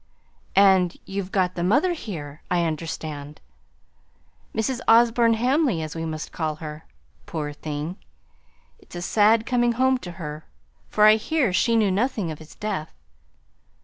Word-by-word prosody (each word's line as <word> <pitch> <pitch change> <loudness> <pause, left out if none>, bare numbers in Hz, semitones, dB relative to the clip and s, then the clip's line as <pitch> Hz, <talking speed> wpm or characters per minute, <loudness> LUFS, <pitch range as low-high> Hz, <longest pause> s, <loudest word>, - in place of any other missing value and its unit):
"And 190 -3 +5
you've 195 -1 -4
got 185 -2 +1
the 175 - -3
mother 290 - +3
here, 155 - -7
I 175 -1 +2
understand. 155 -2 -5 1.1
Mrs. 240 +3 -1
Osborne 230 0 +5
Hamley, 250 - +1
as 155 0 -6
we 165 0 -3
must 155 -1 -5
call 155 -2 -2
her, 155 0 -8 0.4
poor 150 -3 -4
thing! 150 +4 -5 0.8
It's - - -15
a 175 - -4
sad 220 +3 +3
coming 240 -1 +2
home 260 +2 +2
to 175 -7 -8
her; 155 -3 -7 0.4
for 210 - +4
I 215 0 +7
hear 255 - 0
she 230 +5 +2
knew 215 -4 +3
nothing 210 -4 0
of 155 - -8
his 155 0 -14
death." 195 -7 -4
185 Hz, 145 wpm, -24 LUFS, 160-230 Hz, 1.1 s, I